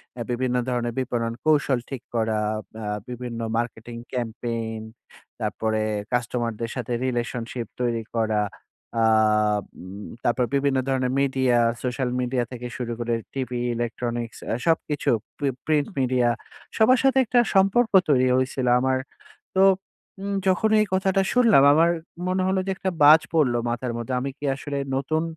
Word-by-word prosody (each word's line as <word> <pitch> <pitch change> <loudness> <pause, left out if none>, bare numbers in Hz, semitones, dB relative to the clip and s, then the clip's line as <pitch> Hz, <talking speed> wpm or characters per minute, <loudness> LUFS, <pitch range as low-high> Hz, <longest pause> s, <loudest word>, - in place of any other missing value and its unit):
অ্যা 120 - -4
বিভিন্ন 125 +1 0
ধরনের 120 -1 -1
বিপণন 115 -2 -1
কৌশল 145 -4 +3
ঠিক 135 -4 -5
করা 110 -1 +1 0.5
আ - - -4 0.2
বিভিন্ন 120 -1 -5 0.2
মার্কেটিং 120 0 -4 0.2
campaign 115 -2 -3 0.6
তারপরে 110 0 -1 0.3
কাস্টমারদের 120 -1 -1
সাথে 125 -1 -3
রিলেশনশিপ 120 -1 -3
তৈরি 115 -2 0
করা। 110 -2 +1 0.6
আ - - +4 0.8
উম 95 +3 -9 0.2
তারপরে 120 +1 +1
বিভিন্ন 140 -1 +2
ধরনের 130 -1 0
মিডিয়া, 130 -3 +2 0.3
সোশ্যাল 125 0 -1
মিডিয়া 125 0 0
থেকে 125 -1 -6
শুরু 120 -1 -4
করে 120 0 -1 0.2
টিভি, 125 -2 -3 0.2
Electronics 120 0 -3 0.3
সবকিছু। 155 -3 +1 0.3
প্রি 140 -1 0 0.2
প্রিন্ট 150 -2 +2
মিডিয়া 125 -2 +2 0.5
সবার 235 +3 +5
সাথে 270 0 +4
একটা 240 +2 +3 0.2
সম্পর্ক 200 +5 +4 0.2
তৈরি 130 -3 +4
হয়েছিল 130 0 0
আমার। 130 +1 +1 0.6
তো 190 - +5 0.6
উম 200 0 -2
যখন 190 +4 +2
এই 215 - +2
কথাটা 190 0 +2
শুনলাম 230 - +5
আমার 165 +2 +4 0.4
মনে 185 0 +1
হলো 190 0 +1
যে - - -1
একটা 190 - -2
বাজ 155 +2 +9
পড়ল 150 -7 +3
মাথার 120 +1 -2
মধ্যে। 120 +2 -4
আমি 135 +2 -3
কি - - -9
আসলে 140 0 -4 0.2
নতুন 155 +4 0
125 Hz, 140 wpm, -24 LUFS, 120-145 Hz, 0.8 s, বাজ